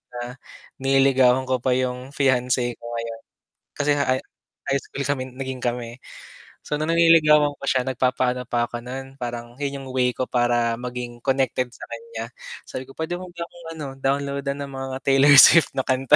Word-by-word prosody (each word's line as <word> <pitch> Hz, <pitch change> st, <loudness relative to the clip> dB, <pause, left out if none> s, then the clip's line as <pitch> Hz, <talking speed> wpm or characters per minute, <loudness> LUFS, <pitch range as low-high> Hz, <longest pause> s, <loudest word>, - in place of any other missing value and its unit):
na 120 Hz, +1 st, -6 dB, 0.4 s
nililigawan 135 Hz, -1 st, +3 dB
ko 130 Hz, 0 st, +1 dB
pa 130 Hz, -, +2 dB
'yong 125 Hz, +1 st, -2 dB
fiance 125 Hz, -3 st, +1 dB
ko -, -, -17 dB
ngayon, 115 Hz, -1 st, -5 dB, 0.6 s
kasi 145 Hz, 0 st, -1 dB
nga 140 Hz, -, +1 dB, 0.6 s
high 140 Hz, -, +2 dB
school 140 Hz, -, -7 dB
kami 140 Hz, -2 st, 0 dB
naging 130 Hz, 0 st, -5 dB
kami, 120 Hz, -1 st, -3 dB, 0.6 s
so -, -, -3 dB
na 150 Hz, -, -2 dB
niligawan 155 Hz, -3 st, +5 dB
ko -, -, -17 dB
siya 130 Hz, -1 st, +1 dB
nagpa-paano 125 Hz, 0 st, 0 dB
pa 120 Hz, -1 st, -1 dB
ako 120 Hz, 0 st, -7 dB
no'n, 135 Hz, +2 st, -7 dB
parang 120 Hz, -2 st, -6 dB
'yon 140 Hz, -1 st, -3 dB
'yong 135 Hz, -, -9 dB
way 125 Hz, -1 st, +2 dB
ko 130 Hz, -, -3 dB
para 120 Hz, -1 st, +1 dB
maging 120 Hz, 0 st, -6 dB
connected 130 Hz, -2 st, 0 dB
sa -, -, -11 dB
kanya, 465 Hz, 0 st, -7 dB, 0.4 s
sabi 130 Hz, -, -6 dB
ko 135 Hz, -, -14 dB
pwede 160 Hz, +2 st, -2 dB
mo 185 Hz, -, -8 dB
ba 175 Hz, -, -14 dB
akong 170 Hz, -1 st, -16 dB
ano, 150 Hz, -, -5 dB
download-an 140 Hz, +1 st, -1 dB
ng 140 Hz, -1 st, -6 dB
mga 135 Hz, 0 st, -5 dB
Taylor 135 Hz, +1 st, +6 dB
Swift 165 Hz, +2 st, +8 dB
na 135 Hz, -, 0 dB
kanta. 130 Hz, +2 st, +4 dB
130 Hz, 180 wpm, -23 LUFS, 125-140 Hz, 0.6 s, Swift